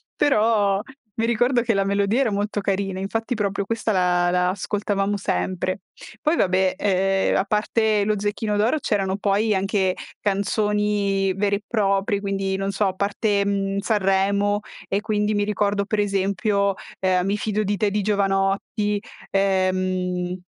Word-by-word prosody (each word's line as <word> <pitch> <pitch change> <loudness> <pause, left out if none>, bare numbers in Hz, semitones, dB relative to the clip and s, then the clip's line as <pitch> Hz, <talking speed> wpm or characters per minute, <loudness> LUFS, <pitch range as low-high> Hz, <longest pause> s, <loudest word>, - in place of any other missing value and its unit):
però 210 -6 +2 0.4
mi 225 - +1
ricordo 240 +2 +2
che 230 -1 +1
la 195 -1 +1
melodia 200 +4 +1
era 245 -5 +1
molto 205 +1 -1
carina, 195 -1 -1
infatti 225 +5 -2
proprio 200 -2 -1
questa 230 +1 -1
la 180 -1 +2
la 180 0 +2
ascoltavamo 205 +1 -1
sempre. 185 -1 -2 0.4
Poi, 310 +2 +2
vabbè, 185 - +2 0.6
uhm, - - +2
a - - +1
parte 215 +1 +1
lo 210 0 0
Zecchino 210 +1 -1
d'Oro, 230 +9 +2
c'erano 195 -7 0
poi, 205 +1 +1
anche, 190 -1 +1 0.3
canzoni 205 -1 0
vere 200 +1 +1
e 205 - -13
proprie, 200 -1 +1
quindi, 195 -1 -2
non 195 0 -2
so, 200 +2 0
a 190 - -1
parte, 200 +1 0
mhmm, 195 -1 -1
Sanremo 200 0 +1 0.3
e 195 - +1
quindi 210 -1 0
mi 205 0 +1
ricordo, 205 -1 0
per 215 +1 -1
esempio, 200 0 +1 0.3
ehm, 185 -1 +1
Mi 200 +2 0
fido 215 0 -1
di 205 0 -1
te 205 +1 +1
di 210 +1 0
Jovanotti, 200 +1 0 0.3
ehm, 185 -2 0
200 Hz, 150 wpm, -23 LUFS, 195-210 Hz, 0.6 s, però